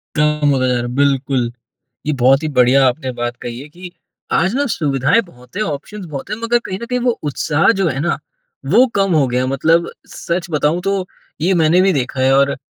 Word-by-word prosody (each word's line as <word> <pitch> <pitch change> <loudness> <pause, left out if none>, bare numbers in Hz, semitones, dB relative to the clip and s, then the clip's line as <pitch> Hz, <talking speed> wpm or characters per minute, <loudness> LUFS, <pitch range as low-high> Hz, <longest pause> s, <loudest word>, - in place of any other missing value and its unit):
कम 150 -1 +2
होता 130 -2 +2
जा 125 - +1
रहा 120 - 0
है, 120 - -4
बिल्कुल। 135 -3 +1 0.5
ये 150 - 0
बहुत 135 +2 +3
ही - - -1
बढ़िया 130 +2 +5
आपने 130 0 -2
बात 120 0 -4
कही 120 0 -6
है 145 - -10
कि, 180 +3 -11 0.4
आज 175 +5 +2
ना 285 +2 +1
सुविधाएँ 145 - +1
बहुत 125 -6 -19
हैं, 215 - +1
ऑप्शन्स 180 +5 -6
बहुत 145 -5 -7
हैं, 215 - -3
मगर 240 +1 +2
कहीं 190 0 -4
न 235 - -4
कहीं 250 +1 -1
वो 245 0 +2 0.2
उत्साह 150 +2 +1
जो 190 - +2
है 135 -2 -2
ना, 170 +3 0 0.5
वो 255 - +5
कम 195 -2 +2
हो 145 -4 +3
गया 125 0 0
है। - - -1
मतलब 165 +5 +2 0.2
सच 170 +1 -4
बताऊँ 150 +3 +1
तो 195 0 -1 0.4
ये 180 +4 +2
मैंने 170 +1 +4
भी 190 0 +3
देखा 130 -2 -2
है 130 +1 +4
और 140 0 +2
150 Hz, 220 wpm, -17 LUFS, 130-180 Hz, 0.5 s, बढ़िया